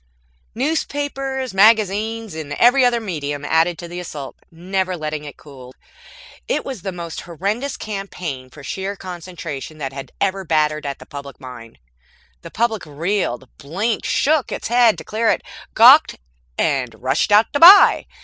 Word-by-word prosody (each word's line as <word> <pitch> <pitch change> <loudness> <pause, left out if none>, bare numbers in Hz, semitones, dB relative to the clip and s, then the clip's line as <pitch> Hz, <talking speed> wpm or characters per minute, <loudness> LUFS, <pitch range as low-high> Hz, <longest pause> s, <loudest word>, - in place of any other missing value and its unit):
_" - - -42 0.5
Newspapers, 275 -2 -2
magazines 215 +1 +2
and 155 -2 -6
every 245 - +4
other 245 -1 +3
medium 145 -8 -5
added 165 +3 +2
to 175 - -8
the 175 +1 -7
assault, 150 -6 -8
never 185 +2 -3
letting 155 -1 -5
it 145 - -10
cool. 130 -3 -14 0.7
It - - -1
was 260 -8 -6
the 190 - -4
most 170 -2 -7
horrendous 200 - -3
campaign, 180 -10 -6
for 140 +2 -14
sheer 190 +8 -4
concentration, 170 -5 -8
that 135 -3 -5
had 135 -1 -8
ever 195 -1 -1
battered 155 -2 0
at 140 - -4
the - - -13
public 140 -1 -10
mind. 125 -4 -11 0.6
The 165 - -10
public 225 +1 -1
reeled, 150 -4 -2
blinked, 200 +10 -2
shook 305 -2 +1
its - - -4
head 240 -2 +4
to - - -8
clear 225 +1 -1
it, - - 0 0.3
gawked, - - +7 0.4
and 130 -6 -1
rushed 135 +10 0
out 210 +2 +4
to 285 - 0
buy. 370 +6 +8
180 Hz, 160 wpm, -20 LUFS, 145-220 Hz, 0.7 s, buy